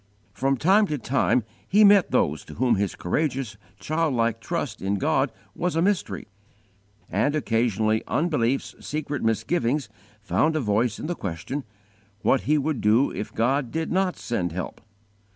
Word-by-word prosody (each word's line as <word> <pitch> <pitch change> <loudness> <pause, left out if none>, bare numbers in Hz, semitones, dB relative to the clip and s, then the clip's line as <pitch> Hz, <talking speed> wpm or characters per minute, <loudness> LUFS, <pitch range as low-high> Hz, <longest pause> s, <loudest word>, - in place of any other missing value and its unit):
From 135 +1 +1
time 195 - +4
to 150 - -2
time 125 0 +1 0.2
he 210 +3 +5
met 200 -3 +6
those 75 +2 +1
to - - -11
whom 125 +1 +2
his 100 -2 0
courageous, 130 - -1 0.2
childlike 130 -8 0
trust 145 -7 -3
in 95 +2 0
God 95 - +1 0.2
was 180 -2 -2
a 165 - +2
mystery; 200 -1 -1 0.8
and 145 - +1
occasionally 110 -5 +1
unbelief's 135 -6 0
secret 150 -1 -3
misgivings 125 +4 0 0.3
found 155 +9 +1
a - - +2
voice 110 -1 +1
in - - -6
the 175 - -1
question, 100 - -5 0.6
_what 135 - +4
he 155 - +5
would 145 -2 -1
do 110 +6 +3
if 105 - -5
God 130 +3 +1
did 160 +3 -3
not 185 0 +1
send 90 -8 -2
help! 90 +2 -5
135 Hz, 150 wpm, -25 LUFS, 110-155 Hz, 0.8 s, met